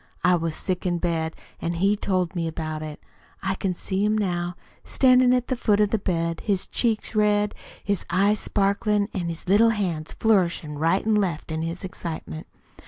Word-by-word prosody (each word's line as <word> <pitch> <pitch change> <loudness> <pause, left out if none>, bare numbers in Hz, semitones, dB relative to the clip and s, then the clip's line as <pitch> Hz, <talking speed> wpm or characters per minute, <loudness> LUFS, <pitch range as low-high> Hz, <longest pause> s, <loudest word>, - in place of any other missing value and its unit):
I 180 - +5
was 165 -2 -2
sick 185 0 -2
in 175 -1 +1
bed, 165 -2 -1 0.3
an' 170 - -1
he 195 +4 +2
told 185 -3 -1
me 170 -1 -1
about 155 -1 -4
it. 155 -1 -7 0.4
I 195 0 0
can 190 -1 -2
see 190 +3 -2
him 210 +1 +2
now, 175 -3 -1 0.3
standin' 255 -1 +4
at 250 -1 +2
the 255 - 0
foot 210 -4 +2
of 210 -1 +3
the 220 - +1
bed, 170 -4 -1
his 195 -4 0
cheeks 225 -3 0
red, 210 -1 +2 0.3
his 200 -3 -1
eyes 200 +4 +3
sparklin' 205 +1 +1
an' 175 -4 -2
his 165 +1 -5
little 210 +5 +5
hands 180 -8 -2
flourishin' 170 -8 +1
right 165 +6 +2
an' 220 - +2
left 180 -7 0
in 160 0 -2
his 165 +3 -4
excitement. 165 -3 -6
185 Hz, 185 wpm, -24 LUFS, 165-210 Hz, 0.4 s, I